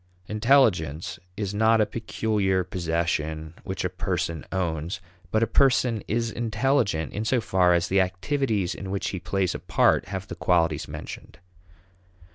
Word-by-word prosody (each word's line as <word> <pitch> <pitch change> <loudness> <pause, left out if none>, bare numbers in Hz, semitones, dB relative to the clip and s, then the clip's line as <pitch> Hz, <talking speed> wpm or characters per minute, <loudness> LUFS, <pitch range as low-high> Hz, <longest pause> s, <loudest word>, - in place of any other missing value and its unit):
Intelligence 100 - +2 0.2
is 100 -1 -2
not 110 +2 +4
a 105 - +4
peculiar 105 -3 0
possession 80 -3 -2
which - - -3
a - - +1
person 80 -2 -2
owns; 85 -2 -2 0.3
but 110 +4 +2
a - - +5
person 125 -4 +3
is 115 +1 0
intelligent 115 - 0
in 105 - -2
so 125 +3 +2
far 90 -4 +3
as 85 +1 +1
the 95 0 +3
activities 100 +1 0
in 95 - -7
which 100 0 -2
he 95 - -4
plays 95 0 -1
a - - -5
part - - +2
have 95 0 -5
the - - -6
qualities 85 -1 +1
mentioned. - - -8
95 Hz, 150 wpm, -26 LUFS, 85-110 Hz, 0.3 s, a